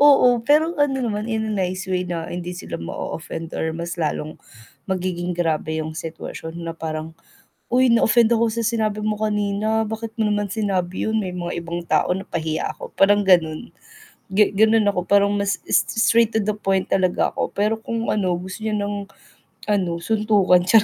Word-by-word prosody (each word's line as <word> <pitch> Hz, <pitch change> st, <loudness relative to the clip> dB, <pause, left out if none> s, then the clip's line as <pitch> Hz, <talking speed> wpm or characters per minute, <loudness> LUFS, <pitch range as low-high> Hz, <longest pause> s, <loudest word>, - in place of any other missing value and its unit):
Oo, 250 Hz, -4 st, +6 dB
pero 305 Hz, +6 st, +3 dB
ano 280 Hz, -2 st, +2 dB
naman 215 Hz, -2 st, -2 dB
in 220 Hz, -1 st, -1 dB
a -, -, -2 dB
nice 185 Hz, -1 st, -2 dB
way 185 Hz, -1 st, 0 dB
na 170 Hz, -2 st, -4 dB
hindi 175 Hz, 0 st, -5 dB
sila -, -, -6 dB
ma-offend 160 Hz, -, -6 dB
or 160 Hz, -, -1 dB
mas 170 Hz, +1 st, -4 dB
lalong 155 Hz, -1 st, -2 dB, 0.5 s
magiging 180 Hz, -1 st, -2 dB
grabe 160 Hz, -2 st, -1 dB
yung 155 Hz, 0 st, -4 dB
sitwasyon 160 Hz, 0 st, -7 dB
na 165 Hz, -, -3 dB
parang, 160 Hz, 0 st, -5 dB, 0.6 s
"Uy 255 Hz, +1 st, +4 dB
na-offend 230 Hz, 0 st, +4 dB
ako 230 Hz, 0 st, +3 dB
sa 230 Hz, +1 st, -2 dB
sinabi 215 Hz, -2 st, 0 dB
mo 215 Hz, -1 st, -1 dB
kanina. 215 Hz, +1 st, 0 dB
Bakit 220 Hz, +1 st, -5 dB
mo 220 Hz, -, +2 dB
naman 205 Hz, 0 st, 0 dB
sinabi 190 Hz, -4 st, -1 dB
yun 220 Hz, 0 st, +1 dB
may 190 Hz, -4 st, -3 dB
mga 175 Hz, -1 st, -4 dB
ibang 170 Hz, +1 st, -5 dB
tao -, -, +2 dB
na 190 Hz, -, -5 dB
pahiya 160 Hz, -1 st, -2 dB
ako," -, -, -9 dB
parang 205 Hz, +1 st, +5 dB
ganon. 170 Hz, +2 st, +3 dB, 0.6 s
Ganon 215 Hz, +2 st, +4 dB
ako 190 Hz, -3 st, +1 dB
parang 200 Hz, 0 st, +4 dB
mas 200 Hz, -1 st, 0 dB
s -, -, +4 dB
s 225 Hz, -, +1 dB
straight 230 Hz, -1 st, +4 dB
to 220 Hz, -, +2 dB
the 210 Hz, 0 st, -1 dB
point 195 Hz, -2 st, 0 dB
talaga 185 Hz, -2 st, +2 dB
ako, -, -, -1 dB
pero 210 Hz, +2 st, +1 dB
kung 230 Hz, +1 st, -3 dB
ano 190 Hz, -4 st, 0 dB
gusto 185 Hz, +4 st, -8 dB
niya 215 Hz, -1 st, -1 dB
ng, 205 Hz, 0 st, -3 dB, 0.7 s
ano 180 Hz, -5 st, +1 dB
suntukan 210 Hz, -3 st, +3 dB
charot 220 Hz, +1 st, +6 dB
200 Hz, 180 wpm, -22 LUFS, 175-220 Hz, 0.7 s, Oo